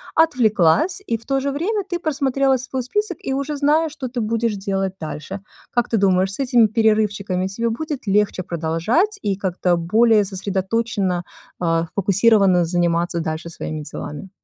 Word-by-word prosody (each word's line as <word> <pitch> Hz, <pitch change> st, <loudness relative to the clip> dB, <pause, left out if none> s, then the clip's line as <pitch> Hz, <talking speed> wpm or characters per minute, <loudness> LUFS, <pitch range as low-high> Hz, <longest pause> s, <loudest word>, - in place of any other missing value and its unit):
отвлеклась, 255 Hz, -, +3 dB
и 230 Hz, -, -1 dB
в -, -, -19 dB
то 270 Hz, -1 st, +1 dB
же 280 Hz, +1 st, -1 dB
время 390 Hz, +9 st, -1 dB
ты 350 Hz, -2 st, -3 dB
просмотрела 275 Hz, -3 st, +1 dB
свой 260 Hz, +1 st, -4 dB
список 415 Hz, -, -2 dB
и 265 Hz, -, -4 dB
уже 280 Hz, +2 st, -2 dB
знаешь, 300 Hz, +2 st, +2 dB
что 275 Hz, -4 st, -5 dB
ты 240 Hz, -1 st, -3 dB
будешь 225 Hz, 0 st, 0 dB
делать 195 Hz, -1 st, -2 dB
дальше. 160 Hz, +5 st, -6 dB, 0.3 s
Как 240 Hz, -2 st, +1 dB
ты 225 Hz, -, +1 dB
думаешь, 190 Hz, 0 st, +2 dB
с -, -, -9 dB
этими 245 Hz, -4 st, +4 dB
перерывчиками 210 Hz, -4 st, +1 dB
тебе 230 Hz, +4 st, -2 dB
будет 285 Hz, -1 st, -4 dB
легче 200 Hz, -1 st, +2 dB
продолжать 175 Hz, -, 0 dB
и 195 Hz, -2 st, -1 dB
как-то 180 Hz, -2 st, 0 dB
более 215 Hz, +5 st, +3 dB
сосредоточенно, 195 Hz, -1 st, -1 dB, 0.4 s
а, 165 Hz, -1 st, +1 dB
сфокусировано 195 Hz, -2 st, +3 dB
заниматься 170 Hz, 0 st, 0 dB
дальше 160 Hz, +1 st, -4 dB
своими 155 Hz, -2 st, -5 dB
делами? 150 Hz, +5 st, -7 dB
210 Hz, 160 wpm, -21 LUFS, 185-265 Hz, 0.4 s, этими